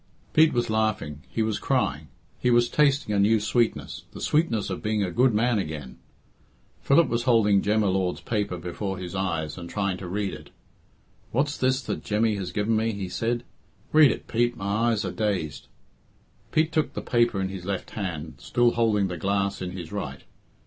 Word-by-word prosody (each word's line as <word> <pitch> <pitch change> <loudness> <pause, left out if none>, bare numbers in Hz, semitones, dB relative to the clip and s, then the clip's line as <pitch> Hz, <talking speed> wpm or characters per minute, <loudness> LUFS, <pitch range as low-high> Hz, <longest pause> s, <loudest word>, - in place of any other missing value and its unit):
Pete 155 0 +6
was 120 -2 0
laughing; 110 -9 -1
he 115 - -1
was 110 -1 -1
crying; 80 - 0 0.3
he 125 - +1
was 120 0 +4
tasting 140 -7 +2
a 100 - +2
new 110 +2 +4
sweetness 115 +2 -1
the - - -8
sweetness 135 - +1
of 95 - -4
being 105 -1 0
a 90 - -2
good 125 +4 +4
man 115 +1 +2
again. 75 -7 -6 0.8
Philip 145 +3 +4
was 120 0 -1
holding 105 -5 +4
Jem 105 +1 +2
y 105 - +2
Lord's 95 -1 0
paper 105 -5 -2
before 95 +3 -4
his 90 -1 -6
eyes, 85 -5 -2
and 85 0 -8
trying 100 -3 -1
to 90 - -7
read 100 +1 -2
it. - - -10 0.8
"What's 145 +4 +1
this 130 0 +1
that - - -4
Jemmy 110 +1 +1
has 95 -3 -4
given 105 +2 0
me?" 110 +1 +1
he 100 -2 -4
said. 115 +5 -1 0.5
"Read 155 -2 +8
it, - - -3
Pete. 120 +1 +1
My 105 +4 0
eyes 110 -2 0
are - - -2
dazed." 100 -9 -2 0.8
Pete 155 +1 +2
took 155 -2 0
the - - -5
paper 120 -4 +2
in 95 0 -1
his 95 -2 -7
left 100 -1 -3
hand, 85 -7 -4
still 120 0 +2
holding 110 -4 +2
the 90 -1 -5
glass 100 +2 -1
in 90 - -3
his 90 -3 -7
right. 80 -10 -5
105 Hz, 190 wpm, -26 LUFS, 95-120 Hz, 0.8 s, Read